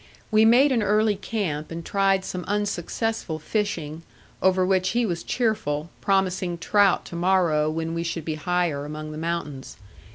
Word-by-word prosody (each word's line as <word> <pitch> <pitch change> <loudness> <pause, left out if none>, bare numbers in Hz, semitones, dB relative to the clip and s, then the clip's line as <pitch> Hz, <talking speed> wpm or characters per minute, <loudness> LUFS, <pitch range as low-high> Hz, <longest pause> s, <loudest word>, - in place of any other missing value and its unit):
We 215 +1 +5
made 255 +5 +6
an 240 -3 +2
early 210 +1 +2
camp 190 -8 -3
and 165 0 -6
tried 195 -1 +2
some 180 -1 -4
unsuccessful 205 -2 -2
fishing, 160 -3 -3 0.4
over 185 -1 +3
which 185 0 +2
he 240 - +3
was 175 -4 -2
cheerful, 170 - -1
promising 185 -3 0
trout 200 +2 +3
to - - -8
morrow 170 -4 +2
when 160 +1 -3
we 170 - -2
should 165 -2 -4
be 160 - -2
higher 170 -2 -1
among 155 +1 -6
the 155 - -6
mountains. 160 -5 -4
180 Hz, 160 wpm, -24 LUFS, 160-205 Hz, 0.4 s, made